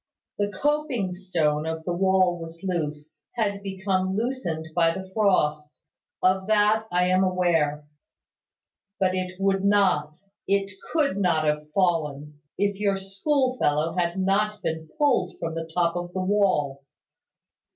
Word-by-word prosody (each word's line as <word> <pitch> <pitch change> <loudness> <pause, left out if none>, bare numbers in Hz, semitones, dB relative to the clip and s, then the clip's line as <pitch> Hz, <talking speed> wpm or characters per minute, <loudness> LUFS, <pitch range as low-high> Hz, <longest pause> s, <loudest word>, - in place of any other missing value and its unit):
The 205 0 0
coping 270 -3 -1
stone 165 -5 -1
of 160 0 -4
the 175 - -2
wall 185 -1 +2
was 165 +2 -9
loose, 155 -4 -4
had 200 -4 -1
become 190 -1 -1
loosened 205 -9 -2
by 165 -1 +4
the 190 0 -6
frost. 150 -8 +1 0.4
Of 190 +1 +2
that 215 +1 +3
I 180 0 +2
am 185 +1 +3
aware. 165 -5 +1 1.1
But 185 -1 +2
it 185 0 -3
would 195 0 +1
not, 185 -7 +2 0.3
it 200 0 +1 0.2
could 290 -11 +1
not 175 -5 +2
have 150 0 -1
fallen, 150 -5 0 0.2
if 200 0 0
your 200 -2 +1
school 255 +7 0
fellow 150 +3 +1
had 175 0 0
not 205 +2 0
been 160 0 -3
pulled 265 -11 +1
from 165 -1 -4
the 165 0 -5
top 170 0 +1
of 175 0 -4
the 185 - -2
wall. 185 -9 +1
185 Hz, 140 wpm, -25 LUFS, 160-200 Hz, 1.1 s, by